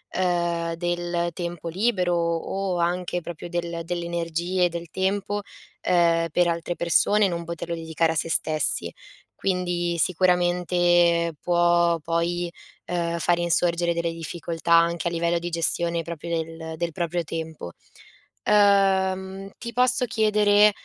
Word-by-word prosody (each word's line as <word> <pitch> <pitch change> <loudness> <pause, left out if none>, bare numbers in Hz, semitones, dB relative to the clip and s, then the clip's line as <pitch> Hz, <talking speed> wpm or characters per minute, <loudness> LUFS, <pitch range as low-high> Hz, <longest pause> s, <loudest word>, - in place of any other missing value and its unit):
uhm, 170 -2 0
del 175 0 -1
tempo 170 -1 -5
libero 185 -1 +1
o 170 +3 -1
anche 175 +1 -1
proprio 175 0 -8
del 170 -1 -3
delle 175 0 -3
energie 170 +2 0
del 170 -1 -7
tempo, 200 +2 -1 0.4
ehm, 170 -2 +2
per 175 +2 +3
altre 170 +1 -2
persone 205 +5 +3
e - - +3
non 170 -1 -3
poterlo 170 0 -5
dedicare 160 0 0
a - - -8
se 165 - -1
stessi. 155 -2 0 0.5
Quindi 175 -2 0
sicuramente 175 -1 +2
può 175 -1 +3
poi, 170 +2 -1 0.4
uhm, 170 -1 -2
far 175 +1 +2
insorgere 170 0 +1
delle 170 0 -2
difficoltà 165 0 -5
anche 170 0 +3
a - - -9
livello 170 0 0
di 175 +1 -4
gestione 170 0 +1
proprio 170 0 -7
del 160 -1 -4
del 170 0 -2
proprio 175 -1 -2
tempo. 160 - -6 0.7
Uhm, 195 -1 +2
ti 235 0 -7
posso 250 0 +2
chiedere, 210 -2 +4
175 Hz, 130 wpm, -24 LUFS, 170-180 Hz, 0.7 s, chiedere